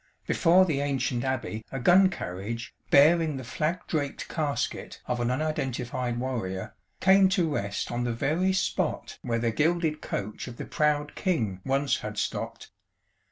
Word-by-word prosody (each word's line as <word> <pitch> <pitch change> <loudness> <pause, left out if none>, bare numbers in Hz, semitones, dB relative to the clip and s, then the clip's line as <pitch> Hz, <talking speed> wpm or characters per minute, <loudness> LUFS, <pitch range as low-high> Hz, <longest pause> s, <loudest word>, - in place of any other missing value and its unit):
Before 180 +2 +5
the 155 -6 0
ancient 135 -3 0
Abbey 130 -4 -2
a 135 - -3
gun 185 +8 +6
carriage, 115 - -5 0.2
bearing 155 +1 +5
the 130 - -6
flag 155 +8 -2
draped 145 -4 -2
casket 145 -6 -2
of 125 -1 -2
an 120 0 0
unidentified 125 -4 -2
warrior, 115 -8 -3 0.3
came 190 0 +6
to 175 -5 +1
rest 100 -6 -2
on 120 0 -1
the 120 - 0
very 160 +11 +1
spot 190 -1 -1
where 115 -2 -1
the 115 0 0
gilded 160 +3 +1
coach 105 +5 -4
of 120 -1 -8
the - - -5
proud 150 -1 0
King 110 - -1
once 135 +1 +1
had 105 0 -6
stopped. - - -3
135 Hz, 155 wpm, -27 LUFS, 120-160 Hz, 0.3 s, gun